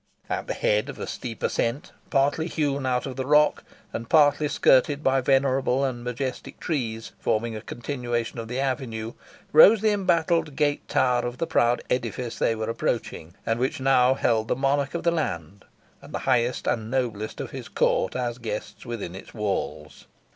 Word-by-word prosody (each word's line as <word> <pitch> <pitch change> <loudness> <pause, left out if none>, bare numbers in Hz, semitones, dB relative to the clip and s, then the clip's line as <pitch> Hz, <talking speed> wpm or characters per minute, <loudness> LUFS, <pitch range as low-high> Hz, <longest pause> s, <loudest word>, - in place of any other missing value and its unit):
At - - -2
the - - -2
head 105 +6 +1
of 135 - -7
a - - -4
steep 120 -3 -6
ascent, 135 +9 -1 0.2
partly 145 +3 +2
hewn 140 -5 -1
out 125 -1 0
of 135 -2 -6
the 130 - -2
rock, 150 +1 +4 0.3
and 115 0 -5
partly 150 -1 +4
skirted 140 +1 +3
by 135 0 +3
venerable 135 0 +2
and 120 -3 -3
majestic 125 +1 -4
trees, 115 -8 -3
forming 115 +1 0
a 110 - -6
continuation 120 -1 -3
of 115 - -5
the 125 +3 -3
avenue, 120 -4 -2 0.4
rose 200 +8 +8
the 215 -1 +3
embattled 165 -6 +1
gate 145 -1 0
tower 125 -1 +2
of 120 0 -4
the 165 - -1
proud 120 -5 +2
edifice 120 -1 -2
they 115 - +2
were 110 0 -3
approaching, 115 -7 -3
and 115 +1 0
which 130 +2 -1
now 130 -1 +4
held 110 -4 +1
the - - +1
monarch 140 +3 0
of 170 - -3
the 170 - +3
land, 100 - -3 0.4
and - - -9
the - - -5
highest 125 -1 +1
and 110 -1 -1
noblest 115 -5 -2
of - - -5
his - - -7
court 95 - +1
as 120 -1 -2
guests 110 -3 -5
within 115 -7 -5
its 95 - -10
halls. 105 -3 -4
125 Hz, 180 wpm, -25 LUFS, 115-140 Hz, 0.4 s, rose